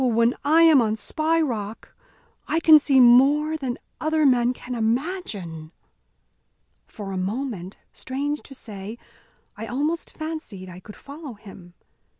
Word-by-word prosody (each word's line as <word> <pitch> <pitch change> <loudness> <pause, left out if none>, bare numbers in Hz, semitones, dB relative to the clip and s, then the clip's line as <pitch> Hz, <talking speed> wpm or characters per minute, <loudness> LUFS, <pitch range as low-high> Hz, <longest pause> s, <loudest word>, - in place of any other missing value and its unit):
when 235 -1 +3
I 315 +4 +5
am 315 -5 +7
on 215 -2 0
Spy 315 +9 -1
Rock 225 -8 -4 0.5
I 325 - +1
can 315 -2 +7
see 275 -2 +3
more 275 +6 +5
than 265 -5 -4 0.2
other 315 0 +1
men 245 -2 +4
can 250 0 -8
imagine." 220 - -3 1.2
For 200 -2 -8
a 190 - -4
moment, 200 -1 -4 0.2
strange 285 +3 -4
to 270 - -13
say, 210 -2 -8 0.6
I 225 +2 -7
almost 300 +7 -3
fancied 310 - -6 0.2
could 210 - -12
follow 280 -3 -10
him. 190 -4 -14
250 Hz, 135 wpm, -24 LUFS, 215-305 Hz, 1.2 s, am